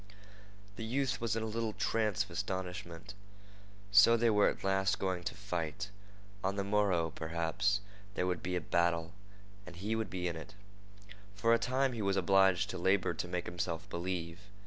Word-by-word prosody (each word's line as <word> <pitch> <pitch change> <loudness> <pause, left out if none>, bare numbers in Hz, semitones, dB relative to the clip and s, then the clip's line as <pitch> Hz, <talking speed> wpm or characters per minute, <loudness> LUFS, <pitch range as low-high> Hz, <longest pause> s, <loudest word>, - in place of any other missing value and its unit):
The 115 - -4
youth 130 +3 -1
was 115 -1 0
in 115 - -1
a - - -1
little 110 0 -2
trance 105 -2 +1
of 100 - -15
astonishment. 90 -2 -4 0.8
So 105 +3 +8
they 115 0 +3
were 105 -1 +5
at - - -6
last 95 0 +2
going 95 -2 -1
to - - -3
fight. 95 -1 -3 0.5
On 95 +1 0
the 100 - -1
morrow, 100 -5 +2
perhaps, 85 +6 0 0.3
there 90 - 0
would 90 -2 -1
be 90 0 -2
a 90 - 0
battle, 85 +1 +1 0.5
and 90 - -9
he 105 +5 -2
would 110 -3 -2
be 90 -1 -2
in 85 - -2
it. 85 +5 -9 0.8
For 115 +3 +3
a 115 - +4
time 130 +3 +1
he 115 - -3
was 100 -1 +1
obliged 95 -1 +4
to - - -5
labor 95 +1 +2
to - - -4
make 90 0 -3
himself 85 0 -3
believe. 85 -1 -3
95 Hz, 180 wpm, -33 LUFS, 85-105 Hz, 0.8 s, So